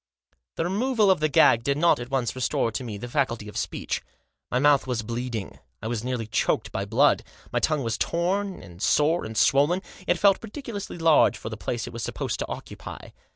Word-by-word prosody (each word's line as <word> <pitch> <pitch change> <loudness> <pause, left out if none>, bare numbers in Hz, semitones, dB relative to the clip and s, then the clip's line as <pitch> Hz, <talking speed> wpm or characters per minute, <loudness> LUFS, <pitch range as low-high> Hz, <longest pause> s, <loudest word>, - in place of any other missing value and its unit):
The - - -1
removal 210 +3 +2
of 185 - +2
the 155 0 +1
gag 115 -4 +5
did 140 +3 +1
not 170 -2 +4
at 120 +1 -6
once 130 -3 -1
restore 125 -2 0
to 130 - -4
me 110 -4 -5
the 120 - -6
faculty 120 -5 -1
of 105 - -10
speech. - - -3 0.5
My 125 - 0
mouth 140 0 +4
was 120 -3 -1
bleeding, 115 -2 -4 0.2
I - - -9
was 115 -1 -2
nearly 125 -2 -2
choked 110 - 0
by - - -2
blood. - - +3 0.3
My - - +2
tongue 155 -3 +1
was 115 -1 -2
torn, 190 +3 -1
and 85 0 -13
sore, 150 +8 +3
and 110 0 -6
swollen. 150 - +3 0.2
It - - +3
felt 200 -2 +4
ridiculously 225 -5 -6
large 165 -2 +4
for 110 - -6
the 110 - -5
place 115 +1 -3
it - - -9
was 115 - -5
supposed - - -3
to - - -2
occupy. - - -8
135 Hz, 205 wpm, -25 LUFS, 115-170 Hz, 0.5 s, gag